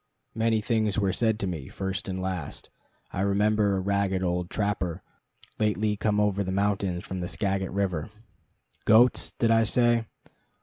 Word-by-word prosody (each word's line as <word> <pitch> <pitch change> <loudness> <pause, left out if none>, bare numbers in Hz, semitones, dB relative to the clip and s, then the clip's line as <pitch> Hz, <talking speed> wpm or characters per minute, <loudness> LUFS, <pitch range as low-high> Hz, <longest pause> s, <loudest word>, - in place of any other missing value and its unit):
Many 110 -1 +1
things 110 -2 0
were 100 -3 +1
said 110 -2 +1
to - - 0
me, 80 -8 -4
first 95 +2 -4
and 95 -1 -3
last. 95 -5 -5 0.4
I 95 - -3
remember 100 +1 +2
a - - 0
ragged 100 -1 0
old 90 0 -1
trapper, 100 -5 -2 0.6
lately 105 0 +1
come 105 0 0
over 100 -1 +1
the 95 - -3
mountains 100 -2 0
from 95 - -5
the 90 - -3
Skagit 95 -1 -1
River. 95 -5 -1 0.8
Goats, 120 +3 +4
did 115 -1 +2
I 115 0 +5
say? 120 +1 +2
100 Hz, 160 wpm, -27 LUFS, 95-110 Hz, 0.8 s, I